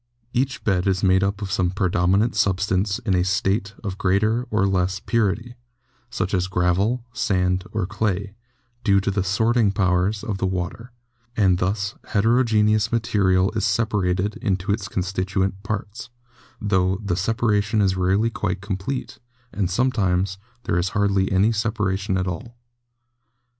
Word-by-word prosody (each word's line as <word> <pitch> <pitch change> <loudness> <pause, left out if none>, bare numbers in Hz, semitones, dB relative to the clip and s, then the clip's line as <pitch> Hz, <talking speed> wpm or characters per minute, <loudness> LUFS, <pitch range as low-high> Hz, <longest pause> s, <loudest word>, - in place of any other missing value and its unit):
Each 130 +1 -1
bed 95 -2 +1
is 95 -1 +1
made 95 0 +4
up 100 +1 -1
of 95 - -5
some 90 -3 +1
predominant 95 +3 +1
substance 100 -1 +1
in 100 - -2
a 90 -1 +3
state 95 +2 0
of 100 -2 -5
greater 110 +6 +1
or 105 -2 +2
less 95 -1 0
purity, 115 +1 -1 0.6
such 105 -5 -3
as 90 -1 +1
gravel, 95 +7 +1
sand 95 -6 0
or 105 -4 -1
clay, 100 0 -2 0.5
due 100 -4 +4
to 100 0 -1
the 100 -1 0
sorting 110 +3 +2
powers 95 +1 +1
of 100 -3 -3
the 95 - +1
water, 95 +6 -4 0.5
and 95 -4 +3
thus 100 +2 -1
heterogeneous 110 -1 +2
material 100 -5 +2
is 110 -2 -2
separated 100 -3 0
into 95 0 -1
its 100 -1 -1
constituent 95 +1 -2
parts, 105 +3 -5 0.5
tho 95 -3 +1
the 90 -3 0
separation 105 +1 +1
is 95 -2 +2
rarely 95 +5 +1
quite 95 -4 -2
complete, 100 +6 -4 0.3
and 95 -3 -1
sometimes 95 -4 0 0.2
there 90 - 0
is 90 +2 0
hardly 100 -2 +2
any 95 +3 +4
sepa 110 -1 -1
ration 95 0 -1
at 90 - -1
all. 115 +7 -6
100 Hz, 145 wpm, -23 LUFS, 95-110 Hz, 0.6 s, made